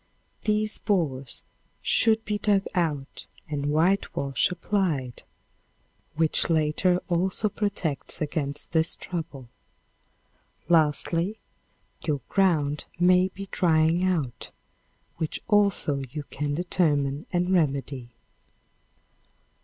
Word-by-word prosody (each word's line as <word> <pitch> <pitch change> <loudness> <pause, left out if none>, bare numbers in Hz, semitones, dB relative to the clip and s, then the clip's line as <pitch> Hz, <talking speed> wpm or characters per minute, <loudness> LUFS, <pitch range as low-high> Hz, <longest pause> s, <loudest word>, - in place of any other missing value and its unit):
These 215 0 +1
borers 145 - 0 0.4
should 220 -1 +4
be 210 -1 -1
dug 200 -1 +2
out 150 -6 -2 0.2
and 145 -2 -3
whitewash 150 -4 +1
applied, 170 -8 -1 0.9
which 160 +2 +2
latter 165 +3 +2
also 185 +4 0
protects 200 -8 -2
against 145 -2 -3
this 160 0 +2
trouble. 160 -7 -6 1.2
Lastly, 165 +4 +2 0.7
your 145 -4 -1
ground 155 -7 +1
may 180 +1 +5
be 195 +1 -9
drying 165 0 +3
out, 165 -10 -1 0.7
which 160 -2 -2
also 200 -9 +2
you 150 +3 -5
can 145 0 -2
determine 150 -5 0
and 180 +1 +1
remedy. 140 -6 0
165 Hz, 90 wpm, -26 LUFS, 145-185 Hz, 1.2 s, may